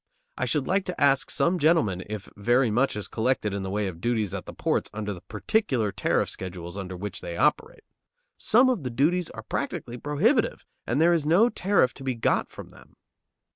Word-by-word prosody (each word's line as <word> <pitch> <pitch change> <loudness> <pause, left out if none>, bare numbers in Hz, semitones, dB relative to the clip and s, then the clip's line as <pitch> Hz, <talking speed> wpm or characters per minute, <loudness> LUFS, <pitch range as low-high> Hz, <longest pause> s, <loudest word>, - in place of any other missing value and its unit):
I - - -1
should 145 -4 0
like 195 +1 +1
to 180 - -5
ask 140 -2 +3
some 180 +1 +1
gentlemen 145 - +2
if 105 -2 -6
very 120 +3 +2
much 125 +4 +1
is 105 - -5
collected 110 -3 0
in 100 - -3
the 95 - -4
way 105 +2 -1
of 85 -3 -6
duties 110 -5 0
at 100 - -6
the - - -6
ports - - -1
under 105 -1 -3
the 90 - -10
particular 115 - 0
tariff - - 0
schedules 90 -1 -7
under 95 -2 -6
which 95 -1 -6
they 85 0 -6
operate. 150 - 0 0.5
Some 245 +4 +4
of 250 -8 +1
the 130 - -3
duties 160 +9 +1
are - - -9
practically 120 - -4
prohibitive, 200 - +1 0.2
and 125 - 0
there 170 +2 +5
is 155 -3 0
no 195 +9 +5
tariff 195 - +2
to 135 - -11
be 130 -2 -1
got 115 - 0
from - - -11
them. - - -18
125 Hz, 205 wpm, -26 LUFS, 100-165 Hz, 0.5 s, there